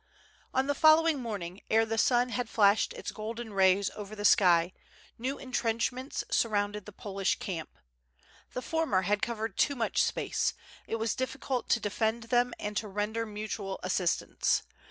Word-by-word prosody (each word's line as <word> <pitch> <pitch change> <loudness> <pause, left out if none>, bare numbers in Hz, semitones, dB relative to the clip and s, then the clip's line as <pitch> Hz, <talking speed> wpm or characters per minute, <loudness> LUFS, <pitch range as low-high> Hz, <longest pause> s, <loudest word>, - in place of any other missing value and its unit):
On 260 +1 +1
the 285 - +1
following 315 +1 +5
morning 200 -6 -5
ere 225 +1 +4
the 225 0 -1
sun 245 +1 +3
had 245 -1 -2
flashed 205 -1 +4
its - - -6
golden 225 +1 -6
rays 190 0 +3
over 210 0 -7
the 205 0 -4
sky, 175 -3 +5 0.5
new 260 +4 -2
entrenchments 250 +1 -2
surrounded 205 -2 0
the - - -8
Polish 195 -1 -2
camp. 165 -5 -6 0.8
The 250 - -4
former 320 - +1
had 205 +2 +1
covered 225 -3 -3
too 285 - +3
much 235 -3 +1
space; - - 0 0.3
it - - -2
was 225 -1 -1
diffi 260 +1 -3
cult 255 -3 -2
to 235 - +4
defend 220 +2 -1
them 245 +1 +2
and 210 0 -4
to 215 - -2
render 210 +3 -2
mutual 210 -2 -5
assistance. 185 -1 +1
220 Hz, 160 wpm, -30 LUFS, 200-245 Hz, 0.8 s, following